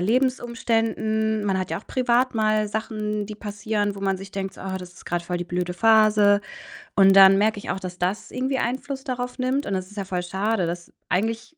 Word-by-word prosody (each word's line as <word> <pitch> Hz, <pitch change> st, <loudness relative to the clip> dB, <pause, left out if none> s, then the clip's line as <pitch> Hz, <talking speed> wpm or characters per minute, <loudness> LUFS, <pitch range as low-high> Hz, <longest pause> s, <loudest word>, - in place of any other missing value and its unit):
Lebensumständen. 225 Hz, -2 st, 0 dB
Man 195 Hz, -2 st, +1 dB
hat 185 Hz, -, -3 dB
ja -, -, -1 dB
auch -, -, -17 dB
privat 250 Hz, 0 st, +1 dB
mal 215 Hz, -1 st, +2 dB
Sachen, 210 Hz, -1 st, -3 dB
die 215 Hz, -, -7 dB
passieren, 205 Hz, 0 st, -2 dB
wo 200 Hz, -, -9 dB
man 195 Hz, -1 st, 0 dB
sich 195 Hz, +1 st, -10 dB
denkt 195 Hz, -1 st, -4 dB
so: -, -, -11 dB
„Oh, 190 Hz, 0 st, -3 dB
das 180 Hz, -1 st, -11 dB
ist -, -, -15 dB
grad 175 Hz, 0 st, -2 dB
voll 175 Hz, +1 st, -3 dB
die 175 Hz, -, -3 dB
blöde 180 Hz, 0 st, -3 dB
Phase.“ 210 Hz, 0 st, +5 dB, 0.6 s
Und 195 Hz, -1 st, +6 dB
dann 195 Hz, 0 st, +8 dB
merke 215 Hz, +1 st, +2 dB
ich 205 Hz, -, -4 dB
auch, 190 Hz, -, -3 dB
dass 180 Hz, -2 st, -7 dB
das 185 Hz, +4 st, -2 dB
irgendwie 260 Hz, +1 st, -1 dB
Einfluss 265 Hz, +2 st, -3 dB
darauf 250 Hz, -1 st, -4 dB
nimmt. 260 Hz, +3 st, 0 dB
Und 200 Hz, -, -3 dB
das 185 Hz, -1 st, -2 dB
ist 205 Hz, -, -15 dB
ja 200 Hz, -, -3 dB
voll 185 Hz, -1 st, -2 dB
schade, 190 Hz, +1 st, -1 dB
dass 170 Hz, 0 st, -6 dB, 0.2 s
eigentlich 225 Hz, -, -2 dB
210 Hz, 220 wpm, -24 LUFS, 190-225 Hz, 0.6 s, dann